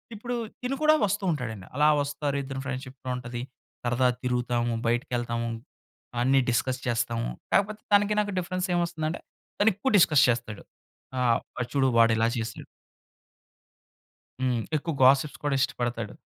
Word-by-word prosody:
ఇప్పుడు 240 +3 -4 0.3
తిను 255 +2 -1
కూడా 310 0 +6
వస్తూ 205 +1 -1
ఉంటాడండి. 110 - -4
అలా 150 +2 +4
వస్తారు, 145 0 -2
ఇద్దరు 135 0 -5
ఫ్రెండ్‌షిప్‌లో 130 -1 -6
ఉంటది, 120 -1 -5 0.4
సరదా 120 +1 +2
తిరుగుతాము, 120 -1 0
బయటికెళ్తాము. 120 0 -1 0.7
అన్నీ 135 +2 +4
డిస్కస్ 130 +2 0
చేస్తాము. 120 0 -1 0.2
కాకపోతే, 210 +2 +2
తనకి 205 +1 +4
నాకు 205 -1 -3
డిఫరెన్స్ 185 +1 -2
ఏమొస్తుందంటే 170 -2 -2 0.4
తను 205 +2 +5
ఎక్కువ 205 +8 -1
డిస్కస్ 155 -6 +6
చేస్తాడు. 115 -3 -2 0.6
ఆహ్, 120 -2 +3 0.3
చూడు 135 -2 +3
వాడు 115 -1 +6
ఇలా 115 +1 +3
చేసాడు 115 -1 -5 1.8
హ్మ్. 125 -3 +1
ఎక్కువ 160 +2 -2
గాసిప్స్ 135 +3 +4
కూడా 145 -1 +1
ఇష్టపడతాడు. 120 -5 -2
130 Hz, 130 wpm, -27 LUFS, 120-170 Hz, 1.8 s, కూడా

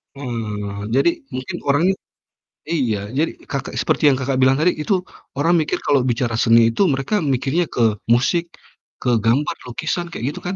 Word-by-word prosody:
Mhm 135 -3 -6
mhm 110 -3 -3
mhm. 100 0 -5
Jadi 140 +5 +4 0.3
mungkin 130 0 -4
orangnya 160 +7 +3 0.8
iya, 125 -10 +1
jadi 150 +5 0 0.2
Kakak 140 -3 -4
seperti 150 - +2
yang 140 - +5
Kakak 130 0 -1
bilang 130 +1 +5
tadi 175 +4 +4
itu 195 - 0 0.4
orang 165 +5 +2
mikir 155 - 0
kalau 140 -2 +3
bicara 120 -1 0
seni 115 -1 +5
itu 115 - -2
mereka 135 +10 0
mikirnya 140 +7 0
ke 110 -6 +1
musik, 165 +8 +1 0.5
ke 125 - 0
gambar, 125 +7 +2
lukisan 160 +7 -2
kayak 145 - -6
gitu, - - -8
kan, 185 - -2
135 Hz, 175 wpm, -20 LUFS, 120-160 Hz, 0.8 s, yang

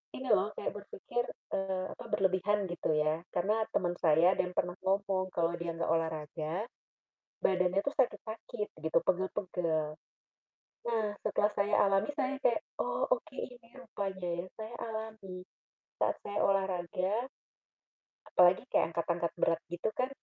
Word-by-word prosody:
ini, 260 - -5
loh, 205 0 +4
kayak - - -2
berpikir, 205 +4 -3 0.3
eee, 190 -1 -1
apa - - -9
berlebihan 195 +1 +2
gitu, 175 - -2
ya. 155 +1 +2 0.2
Karena 210 +5 +2 0.2
teman 175 -1 +2
saya 165 +2 +6
ada - - -8
yang 180 0 -4
pernah 180 - +1
ngomong, 190 0 +1
kalau 170 0 +2
dia 170 -1 -3
enggak 165 -1 0
olahraga 160 -1 -1 0.9
badannya 185 0 +3
tuh 280 - -2
sakit-sakit, 225 -4 -1 0.2
gitu, 160 - +3
pegal-pegal. 175 -4 0 0.9
Nah, 225 -2 +2 0.2
setelah 210 - +2
saya 205 0 +1
alami 195 +1 +3
saya 275 -1 -1
kayak, 260 +6 +2 0.2
"Oh, - - +1
oke 315 - -1
ini 245 -2 -7
rupanya, 195 -7 -4
ya," 180 - -6
saya 220 +2 -6
alami 220 -5 -5 0.5
saat - - +2
saya 205 - -3
olahraga, 185 -1 +1 1.2
apalagi 180 0 +6
kayak 165 - +2
angkat-angkat 170 0 0
berat 165 - +3
gitu 175 +5 -1
kan 255 0 +1
190 Hz, 140 wpm, -32 LUFS, 175-215 Hz, 1.2 s, saya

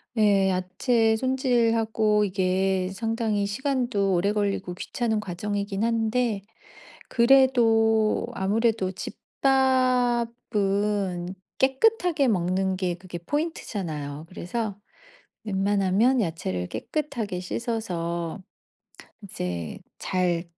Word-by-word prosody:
네. 200 -3 +4
야채 220 +5 +1
손질하고 230 -4 +2
이게 190 -1 0
상당히 225 -1 -1
시간도 240 -3 0
오래 195 +4 +2
걸리고 200 -3 -1
귀찮은 220 +3 -2
과정이기는 200 +2 -2
한데 230 -1 0 0.7
그래도 235 -4 +4
아무래도 215 0 +1
집밥은 235 -8 0 0.3
깨끗하게 305 - +3
먹는 190 -1 +1
게 180 -2 -1
그게 180 -1 -8
포인트잖아요. 170 - -4
그래서 200 +3 -4 0.7
웬만하면 200 +4 +2
야채를 150 - -3
깨끗하게 220 - -3
씻어서 175 -6 -3 0.8
이제 90 - -5 0.2
잘 180 -2 0
210 Hz, 220 characters per minute, -25 LUFS, 185-235 Hz, 0.8 s, 네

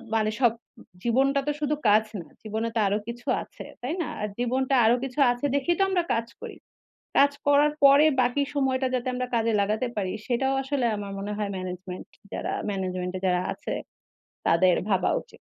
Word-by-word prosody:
মানে 215 -1 +2
সব 240 -2 +6 0.5
জীবনটা 270 +4 +2
তো - - +3
শুধু 300 +1 +1
কাজ 215 +1 +5 0.2
না। - - -12 0.2
জীবনে 220 +1 -2
তো - - +2
আরো 205 +2 +1
কিছু 240 +1 -8 0.2
আছে। - - -11 0.2
তাই 260 +6 -2
না? - - -2
আর 210 - -1
জীবনটা 260 +2 0
আরো 235 +2 +5
কিছু 270 +2 -5
আছে 245 +4 -3
দেখেই 310 +5 +1
তো - - +5
আমরা 360 -2 +1
কাজ 230 0 -1
করি। - - -7 0.6
কাজ 280 0 +6 0.2
করার 290 +1 +5
পরে 280 +2 +8 0.2
বাকি 250 +3 +1
সময়টা 265 -1 +1
যাতে 255 0 -1
আমরা 250 0 -2
কাজে 230 0 +2
লাগাতে 215 +5 0
পারি 190 -3 -1 0.2
সেটাও 265 +2 +1
আসলে 270 -2 -1
আমার 200 -1 -6
মনে 205 +1 -4
হয় 205 -1 -2
ম্যানেজমেন্ট 185 0 -6 0.3
যারা - - -3 0.2
ম্যানেজমেন্ট 185 -2 -3
এ - - -5
যারা 180 -1 +2
আছে - - -7 0.8
তাদের 175 +2 +4
ভাবা 190 -3 +2
উচিত। - - -19
240 Hz, 185 wpm, -26 LUFS, 205-270 Hz, 0.8 s, পরে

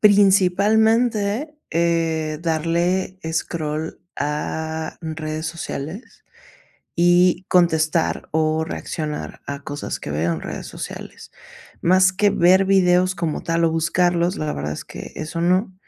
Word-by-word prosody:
Principalmente, 210 - +3 0.2
eh, 165 -2 0
darle 170 +3 0
scroll 160 -1 -3 0.2
a, 160 +2 -3
mm, 160 - -3
redes 155 0 -4
sociales 170 - -6 0.7
y 175 +1 +4
contestar 165 -2 +2
o 155 0 +1
reaccionar 155 -2 -5
a 140 0 -5
cosas 145 +1 -5
que 75 - -6
veo 80 +3 0
en 80 - -5
redes - - -6
sociales, - - -8 0.5
más 185 +1 +4
que 205 +2 +3
ver 185 +1 +4
videos 185 -1 +3
como 170 -3 -2
tal 165 0 0
o 160 - +2
buscarlos, 175 +2 +1
la 155 -1 -2
verdad 75 +1 -3
es - - -8
que - - -9
eso 160 +2 -4
no, 185 +3 +2
170 Hz, 125 wpm, -21 LUFS, 155-185 Hz, 0.7 s, y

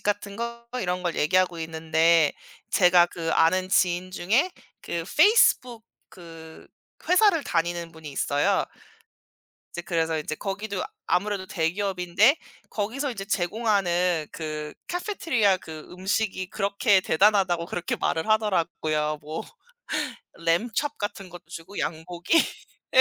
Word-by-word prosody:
급식 - - -26
같은 205 -1 -2
거 235 +1 -5
이런 180 -2 -2
걸 175 -2 -1
얘기하고 180 +2 +2
있는데 160 0 +2 0.4
제가 180 -2 +5
그 165 -2 -4
아는 185 +3 +3
지인 180 -1 +1
중에 225 - +1 0.3
그 170 -1 -4
페이스북 275 - +4 0.2
그 165 -2 -13 0.4
회사를 365 -4 +4
다니는 170 0 -1
분이 160 -2 -10
있어요. 145 +8 +1 1.1
이제 175 - -4
그래서 165 -2 0
인제 155 0 -4
거기도 200 +1 -4 0.2
아무래도 200 0 0
대기업인데 185 - +2 0.3
거기서 245 +7 -2
이제 200 -5 -6
제공하는 180 -5 0
그 155 -1 -5 0.2
카페테리아 320 - +1
그 160 -3 -9
음식이 190 0 -2
그렇게 200 0 +2
대단하다고 185 -2 +2
그렇게 175 0 -3
말을 160 +5 -1
하더라고요. 165 -8 0
뭐 155 +2 -5 1.0
램촙 220 - 0
같은 205 -2 -5
것도 175 -1 -12
주고 170 +4 -9
양고기? 170 - 0 0.6
예. - - 0
180 Hz, 285 characters per minute, -25 LUFS, 165-205 Hz, 1.1 s, 제가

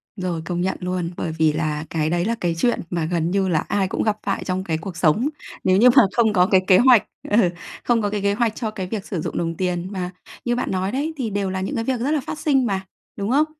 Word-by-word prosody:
Rồi, 180 -4 -3
công 175 0 -2
nhận 190 +1 -1
luôn, 180 -2 -2
bởi 165 - -2
vì 155 -1 +3
là 155 -1 -2
cái 155 -1 0
đấy 175 +1 0
là 230 +2 0
cái 170 -2 0
chuyện 240 +8 +1
mà 170 -3 -1
gần 170 0 -1
như 195 -1 +1
là 165 -4 +2
ai 200 -2 0
cũng - - -2
gặp 215 -1 +1
phải 195 - -2
trong 185 0 -2
cái 160 -4 -1
cuộc 170 +1 -7
sống 185 - +2 0.3
nếu 185 0 +4
như 245 +4 +7
mà 265 - +9
không 225 -3 +3
có 180 -2 +5
cái 190 -2 +4
kế 185 -2 +7
hoạch 245 -3 +6 0.3
ừ, 205 -4 +4 0.3
không 235 -2 +2
có 205 - 0
cái 205 -1 -2
kế 200 0 +2
hoạch 225 0 0
cho 220 -4 -3
cái 190 -3 -5
việc 205 -1 -4
sử 175 -6 -3
dụng - - -4
đồng 165 -1 -2
tiền, 180 -1 -1
mà 180 -2 -4 0.3
như 240 0 +1
bạn 245 - -2
nói 190 +1 -1
đấy, 295 +5 -2
thì 240 -5 -2
đều 200 -1 -1
là 190 0 -3
những 190 - -3
cái 225 - -1
việc 255 -1 -1
rất 280 +4 0
là 300 -3 +1
phát 300 - -6
sinh 270 -4 +2
mà, 195 -3 -1 0.3
đúng 200 +1 -3
không? 295 +3 +4
190 Hz, 280 wpm, -22 LUFS, 175-225 Hz, 0.3 s, mà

